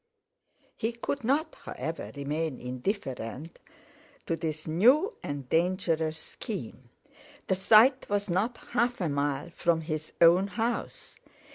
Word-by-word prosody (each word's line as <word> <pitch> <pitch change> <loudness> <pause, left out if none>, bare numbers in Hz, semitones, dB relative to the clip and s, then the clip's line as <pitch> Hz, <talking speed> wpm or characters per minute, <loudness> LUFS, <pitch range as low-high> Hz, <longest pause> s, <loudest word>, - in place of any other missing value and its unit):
He 225 +2 -2
could 245 +3 -3
not, 280 +7 +1
however, - - -5
remain 145 0 -2
indifferent 130 - -4 0.7
to 165 - 0
this 155 -1 -4
new 255 - +4
and 145 -3 -5
dangerous 165 -1 +1
scheme. - - -7 0.6
The 190 - +1
site 225 +7 +5
was 205 0 0
not 205 +7 0
half 245 0 +1
a 175 -4 0
mile 145 +2 -1
from 170 -1 +1
his 155 -1 -4
own 175 +3 +6
house. 230 +3 -3
170 Hz, 120 wpm, -29 LUFS, 155-225 Hz, 0.7 s, own